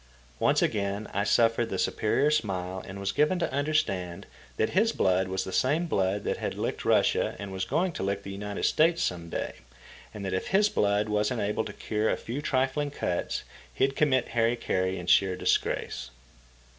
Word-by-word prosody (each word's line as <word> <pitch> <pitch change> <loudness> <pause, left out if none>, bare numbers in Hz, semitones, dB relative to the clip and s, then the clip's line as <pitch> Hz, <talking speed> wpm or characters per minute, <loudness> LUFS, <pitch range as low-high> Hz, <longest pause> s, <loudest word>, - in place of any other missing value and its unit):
Once - - +3
again 100 +1 -1
I 100 - +1
suffered 115 +2 +3
the - - -2
superior 140 +7 +1
smile 95 -9 -1
and 100 +1 -7
was 100 0 -1
given 150 +5 +2
to 165 -6 -2
understand 130 - -1 0.3
that 110 - +1
his 220 +4 +3
blood 95 0 +2
was 95 0 -2
the 95 - -6
same 150 +7 +2
blood 100 - 0
that - - -1
had - - -3
licked - - -3
Russia - - +2
and 100 +1 -6
was 95 -1 -2
going 180 - 0
to - - -6
lick 100 +1 -2
the 100 - -7
United 100 +1 -5
States 165 +2 +3
some 85 -2 -3
day, - - -4 0.5
and 105 -2 -7
that 95 - -2
if 95 - -2
his 205 +2 +3
blood 105 - +1
wasn't 105 +3 0
able 105 +2 -1
to - - -7
cure 110 0 -1
a - - +1
few 125 +5 -5
trifling 135 +1 0
cuts, 90 -10 -2 0.3
he'd 135 0 +1
commit 130 -5 +2
hari 115 0 +2
kari 95 -5 -1
in 90 - -6
sheer 95 +1 +4
disgrace. 60 -7 -1
105 Hz, 190 wpm, -28 LUFS, 95-135 Hz, 0.5 s, sheer